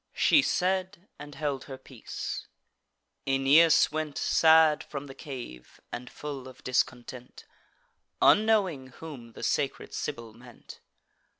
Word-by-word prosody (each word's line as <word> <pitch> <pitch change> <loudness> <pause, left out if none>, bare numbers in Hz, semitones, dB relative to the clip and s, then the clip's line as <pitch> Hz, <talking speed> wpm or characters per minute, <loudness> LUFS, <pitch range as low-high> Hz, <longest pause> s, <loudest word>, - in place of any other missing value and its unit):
She 300 - +5
said, 185 -2 -1
and 145 -1 -10
held 145 -3 -3
her 135 - -8
peace. 130 -3 -7 0.8
Aeneas 140 +5 +5
went 155 -2 -4
Sad 160 -1 +4
from 140 -1 -7
the 135 - -10
cave, 120 - -10
and 125 +1 -7
full 140 -3 -7
of 130 - -14
discontent, 125 0 -3 0.7
Unknowing 205 -11 +3
whom 130 -4 -11
the - - -10
sacred - - -2
Sibyl 115 -2 -5
meant. 120 +1 -14
140 Hz, 115 wpm, -28 LUFS, 125-160 Hz, 0.8 s, She